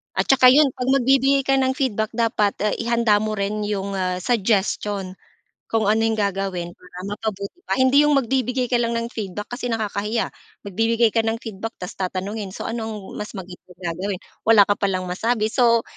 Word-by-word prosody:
At - - +2
tsaka 260 -1 +6
'yon 275 +1 +6
'pag 250 0 -5
magbibigay 270 +1 +3
ka 270 0 +2
ng 260 0 +1
feedback 220 -6 0
dapat, 225 -3 +1 0.2
ihanda 235 -3 +2
mo 215 0 -2
rin 205 +1 -2
'yong, 200 -1 -2
ah, 185 -1 0
suggestion, 200 -3 0 0.5
kung 220 -2 +1
ano 215 +1 +3
'yong 220 -1 0
gagawin 195 -3 -2
para 180 0 -14
mapabuti 205 - -5
pa. - - 0
Hindi 260 +3 +5
'yong 295 -1 +3
magbibigay 255 0 0
ka - - +1
lang 235 0 0
ng 230 - -2
feedback 210 -2 -5
kasi 245 - -5
nakakahiya, 215 0 -1 0.4
magbibigay 225 +3 +2
ka 225 - +3
ng 225 +1 0
feedback 225 +1 -6
tapos 180 - -7
tatanungin 195 +2 -4
so - - -6
ano 225 -1 -3
ang - - -5 0.2
mas 210 +1 -6
maigi 185 -2 -8
na 180 -1 -6
gagawin 185 +2 -3 0.3
wala 220 -2 +8
ka 205 - +2
palang 185 -2 -1
masabi. 220 +3 0
So 235 -2 +3
220 Hz, 185 wpm, -22 LUFS, 200-235 Hz, 0.5 s, wala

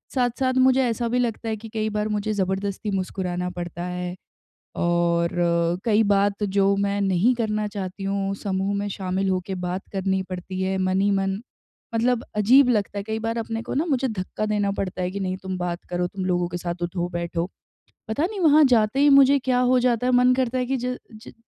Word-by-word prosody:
साथ-साथ 255 +1 +1
मुझे 260 0 +4
ऐसा 235 0 -1
भी 250 +2 +1
लगता 230 -2 -2
है 220 - -1
कि 225 +1 -10
कई 220 -1 -1
बार 210 0 -1
मुझे 210 0 -1
ज़बरदस्ती 195 +1 -2
मुस्कुराना 180 -2 -2
पड़ता 175 -1 -6
है 180 0 -4 0.6
और 170 0 +1 0.5
कई 220 -1 +4
बात 200 +1 +1
जो 200 0 +2
मैं 200 0 0
नहीं 195 +5 +3
करना 215 -3 -1
चाहती 195 -1 -5
हूँ, 195 0 -1
समूह 195 0 -2
में 205 0 -2
शामिल 190 0 -2
होके 185 +1 -2
बात 180 +2 -3
करनी 190 0 0
पड़ती 185 +1 -5
है 190 0 0
मन 185 0 +1
ही 200 +1 +3
मन, 195 0 0 0.5
मतलब 235 +1 +1
अजीब 245 +6 +6
लगता 210 -4 0
है - - -2
कई 220 +1 -3
बार 225 +1 -2
अपने 225 0 -3
को - - -5
ना, 295 - +1
मुझे 270 -4 +1
धक्का 215 0 -3
देना 205 -1 0
पड़ता 185 -2 -3
है 180 - -1
कि 200 - -5
नहीं 185 -1 -2
तुम 190 -1 -4
बात 175 -1 -3
करो, 180 0 0
तुम 190 +1 -5
लोगों 175 -1 0
के 175 - -5
साथ 175 0 -5
उठो-बैठो। 175 -1 -2 0.6
पता 220 +7 -1
नहीं 405 +2 -5
वहाँ 310 -3 +6
जाते 235 -1 +3
ही 290 +1 +6
मुझे 275 0 +7
क्या 255 -1 +1
हो 250 0 +4
जाता 245 -1 +1
है, - - +3
मन 250 0 +5
करता 255 -1 0
है 250 - 0
कि 265 +1 -1
ज 250 +1 -3 0.3
ज - - -10
200 Hz, 205 wpm, -24 LUFS, 185-235 Hz, 0.6 s, मुझे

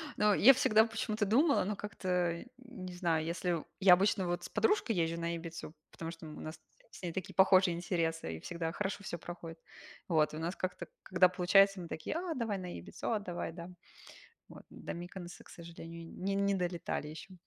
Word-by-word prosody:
Ну, 210 -1 +4
я 260 +8 +8
всегда 220 -3 +5
почему-то 220 -1 -1
думала, 275 +9 +4
ну, 210 +2 -1
как-то 180 -3 -2
не 235 -8 -9
знаю. 165 -3 0
Если 170 -1 -1 0.2
я 190 -2 +8
обычно 190 0 +3
вот 175 0 -2
с - - -6
подружкой 415 - +2
езжу 165 0 0
на 170 0 -1
Ибицу, 165 -2 -7 0.2
потому 165 0 -6
что 165 -1 -11
у 155 - -9
нас 155 0 -7 0.3
с - - -13
ней 175 - -2
такие 185 +1 -5
похожие 185 -2 +5
интересы 165 - -2
и - - -10
всегда 165 - -4
хорошо 200 +2 -3
всё 170 - -4
проходит. 165 -1 -8 0.5
Вот. 155 -4 +2
У 155 - -5
нас 170 +3 -2
как-то, 185 -1 -4 0.2
когда 185 0 +5
получается, 195 +2 +4
мы 170 - -7
такие: 160 - -4
"А, 340 0 -2
давай 225 -6 -2
на 180 -1 -6
Ибицу!"- 85 - -5
"А, 215 - +1
давай, 175 -4 -4
да!" 170 +1 -8 0.8
Вот. - - -12
До - - -7
Миконоса, 175 +1 -8
к - - -18
сожалению, 170 0 -9
не 195 +1 -1
не 200 0 +2
долетали 175 -4 -2
еще. 160 +5 -10
180 Hz, 190 wpm, -33 LUFS, 170-200 Hz, 0.8 s, я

